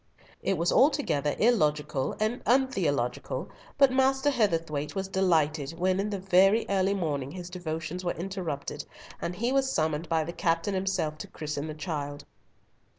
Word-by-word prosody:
It - - 0
was 170 +2 +1
altogether 175 - +3
illogical 150 - +1
and 215 +3 0
untheological; 180 - 0 0.3
but 275 -2 +6
Master 265 +2 +3
Heatherthwayte 165 - 0
was 190 0 -2
delighted 165 -5 +1
when 185 +2 +1
in 205 +2 0
the 205 - -2
very 195 +3 +4
early 195 0 +2
morning 145 -8 -2
his 180 +3 -8
devotions 170 0 -4
were 175 - 0
interrupted, 165 -6 -4 0.4
and 175 - -3
he 235 +6 0
was 270 0 +2
summoned 155 - -1
by 160 -1 +2
the 170 +2 -6
captain 165 +2 0
himself 185 -5 -1
to - - -6
christen 150 -1 -4
the 155 - -6
child. 145 -3 -4
175 Hz, 150 wpm, -28 LUFS, 155-200 Hz, 0.4 s, but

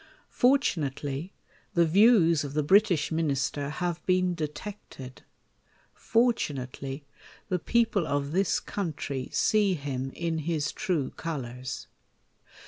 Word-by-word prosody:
Fortunately, 155 - +1 0.4
the 170 -1 +5
views 170 -3 +5
of 140 0 -6
the 150 - +2
British 185 -2 +3
Minister 145 -2 -1
have 175 +2 -3
been 185 -1 +2
detected; 150 -4 -7 0.7
fortunately, 140 - -1 0.4
the 180 -2 0
people 225 -4 +1
of 140 0 -1
this 190 +3 +2
country 145 -8 -4
see 210 -4 +2
him 135 -3 -4
in 165 -1 -2
his 155 -1 -1
true 165 -9 -1
colours. 130 -5 -5
160 Hz, 105 wpm, -28 LUFS, 140-185 Hz, 0.7 s, the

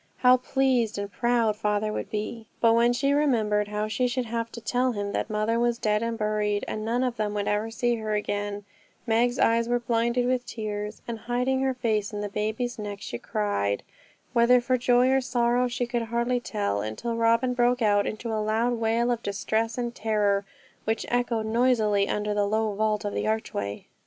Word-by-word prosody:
How 255 0 +6
pleased 250 -4 +1
and 200 0 -4
proud 235 -2 +1
father 210 0 -1
would - - -4
be! 220 +1 -4
But 230 -1 +5
when 235 +1 +4
she 275 +3 +1
remembered 220 -8 +2
how 210 +1 -2
she 220 +4 0
should 250 0 -1
have 230 0 -3
to 235 - -6
tell 250 +2 0
him 205 -1 -3
that - - -2
mother 215 +2 0
was 240 0 +1
dead 210 -2 +1
and 230 0 -2
buried, 210 -1 0
and 215 - -4
none 235 +3 0
of 250 -2 -1
them 210 -1 -1
would 205 -1 -1
ever 210 +2 0
see 240 +1 0
her 215 -1 -2
again, 205 0 -3 0.4
Meg's 240 +2 +2
eyes 230 +1 +2
were 245 - +3
blinded 235 +1 +1
with 250 0 +1
tears, 210 -2 -5
and 230 -1 -4
hiding 255 +2 +1
her 265 -1 0
face 215 -4 0
in 205 - -3
the 205 - -3
baby's 220 +4 -2
neck, 205 -1 -5
she 120 - -6
cried, 100 -1 -1 0.5
whether 245 +1 +5
for 255 +1 +1
joy 250 +1 +3
or 265 0 +3
sorrow 245 0 +1
she 245 0 -2
could 240 0 -2
hardly 235 +1 0
tell; 205 - -2
until 110 - -3
Robin 230 +2 +2
broke 245 0 +2
out 205 -1 +3
into 225 +1 -4
a 215 - 0
loud 220 +3 +1
wail 230 +1 +1
of 235 -1 -1
distress 220 +3 -1
and 240 -1 -2
terror, 205 -3 +1 0.4
which 220 +1 -1
echoed 240 -2 0
noisily 220 -3 +2
under 210 0 -1
the 205 0 +1
low 215 0 0
vault 215 0 0
of 205 - -2
the - - -1
archway. 100 - -3
225 Hz, 200 wpm, -26 LUFS, 210-245 Hz, 0.5 s, How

